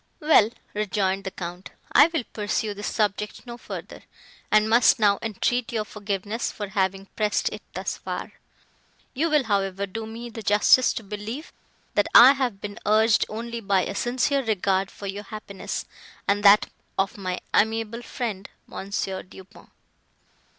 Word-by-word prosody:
"Well," 300 - +5 0.2
rejoined 195 -2 -1
the - - -1
Count, 180 0 -7 0.2
"I 290 - +7
will 325 -5 -2
pursue 210 0 -1
this 205 +1 -5
subject 210 +1 -2
no 240 -1 -7
further, 240 - -8 0.5
and 215 0 +5
must 230 +2 +5
now 205 -2 +3
entreat 230 +2 -1
your 220 -2 -1
forgiveness 205 +2 -3
for 205 -2 -6
having 195 0 -1
pressed 210 -2 +1
it - - -8
thus - - -3
far. - - -5 0.8
You 315 +5 0
will, 300 -3 +3
however, 200 -3 -1
do 220 +3 -6
me 235 +2 -8
the 225 - -7
justice 210 +5 +5
to 225 - -5
believe, 215 +8 -7 0.4
that 205 - +2
I 250 +3 +11
have 255 -7 -1
been 205 0 -7
urged 215 +1 +3
only 230 +2 -5
by 195 -3 +2
a - - -4
sincere 255 +5 0
regard 195 -3 0
for 200 - -10
your 200 +1 -5
happiness, 205 -3 -6 0.4
and 205 +1 +2
that 205 0 +6 0.3
of 195 +4 0
my 185 -3 -3
amiable 225 +1 +1
friend 220 -6 -5 0.2
Mons. 195 +1 -4
Du 190 0 -8
Pont." 195 +3 -19
210 Hz, 155 wpm, -25 LUFS, 195-230 Hz, 0.8 s, I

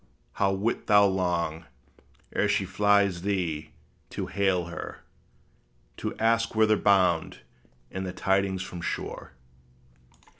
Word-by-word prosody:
how 100 -1 +1
wilt 100 +5 -2
thou 105 -1 +6
long, 85 -4 -1 0.7
ere - - +2
she - - +1
flies 100 -3 +2
thee, 85 -6 -2 0.4
to - - -4
hail 95 -3 0
her, 85 - -8 0.9
To - - -4
ask 115 0 +1
whither 110 0 +4
bound, 95 -6 +2 0.5
and 95 - -4
the 95 - -4
tidings 95 0 0
from 90 -2 -8
shore! - - -5
95 Hz, 115 wpm, -27 LUFS, 90-100 Hz, 0.9 s, thou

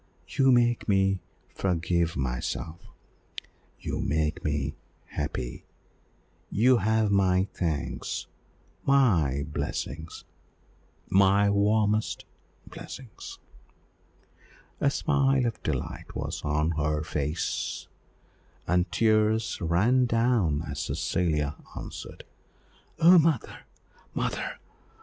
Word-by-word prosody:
You 135 -1 +3
make 120 -2 +3
me 95 -1 +3 0.3
forgive 85 -2 0
myself, 65 +5 -3 1.0
you - - -4
make 75 +1 -1
me 75 -1 -1 0.4
happy, 60 -1 -4 0.8
you 125 +4 +4
have 110 0 +2
my 95 -1 +3
thanks 80 -5 -3 0.6
my 85 - +3
blessing 75 +2 -3 1.0
my 100 +1 +4
warmest 105 +1 +1 0.4
blessing!" 130 -5 -9 1.7
A 140 - +3
smile 135 -3 +2
of 115 -2 -3
delight 70 -5 -4
was - - -4
on 75 +2 +1
her 75 -1 0
pale - - -5
face, 75 +1 -2 0.8
and 90 +2 +1
tears 110 -1 +2
ran 105 +10 +3
down 115 -11 +2
as 70 +1 -5
Cecilia 75 -5 -1 0.2
answered - - -8 0.7
"Oh, 175 +2 +8
mother, 160 -1 0 0.5
mother! - - -2
95 Hz, 90 wpm, -27 LUFS, 75-115 Hz, 1.7 s, Oh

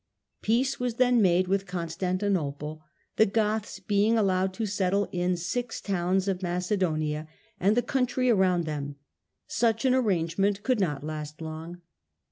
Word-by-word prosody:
Peace 245 +5 +1
was 245 -2 -1
then 245 -1 +4
made 185 -1 +3
with 195 +1 0
Constantinople, 170 -3 -2 0.4
the 220 - +6
Goths 215 +1 -1
being 210 +2 +2
allowed 190 -2 +2
to 225 - -2
settle 200 0 +1
in 180 0 0
six 230 +8 -3
towns 190 0 0
of 190 -1 -1
Macedonia 175 -4 -1 0.3
and 205 +5 +3
the 245 - +3
country 255 -1 0
around 190 -6 +3
them. 145 -2 -4 0.5
Such 230 +2 +1
an 255 - +4
arrangement 195 -3 +1
could 255 -4 +1
not 150 -7 -1
last 150 -1 -6
long. 165 +2 -7
190 Hz, 140 wpm, -27 LUFS, 170-215 Hz, 0.5 s, the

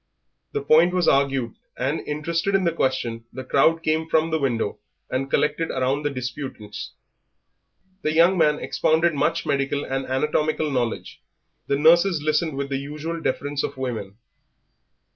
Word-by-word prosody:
The - - -2
point 165 +5 +5
was 180 -2 +2
argued, 135 -4 +2 0.2
and, 135 +5 -1
interested 165 +6 -1
in 195 - +2
the 170 - +2
question, 125 -6 -1
the 130 - -7
crowd 160 +5 +2
came 160 +1 0
from 160 0 +2
the 160 - +1
window 120 -7 -1 0.3
and 135 +1 -1
collected 150 +3 +1
round 130 +3 0
the 145 - +1
disputants. 125 -5 -6 1.1
The 155 - 0
young 170 +4 +5
man 150 -4 +3
expounded 160 +3 +1
much 150 +3 0
medical 140 0 0
and 135 0 -3
anatomical 150 +3 0
knowledge; 120 -4 -3 0.5
the 140 - +1
nurses 170 +3 +5
listened 155 0 0
with 140 0 -3
the 135 - -1
usual 155 +4 -5
deference 145 +1 -1
of 140 - -4
women. 110 -6 -4
145 Hz, 150 wpm, -23 LUFS, 130-160 Hz, 1.1 s, point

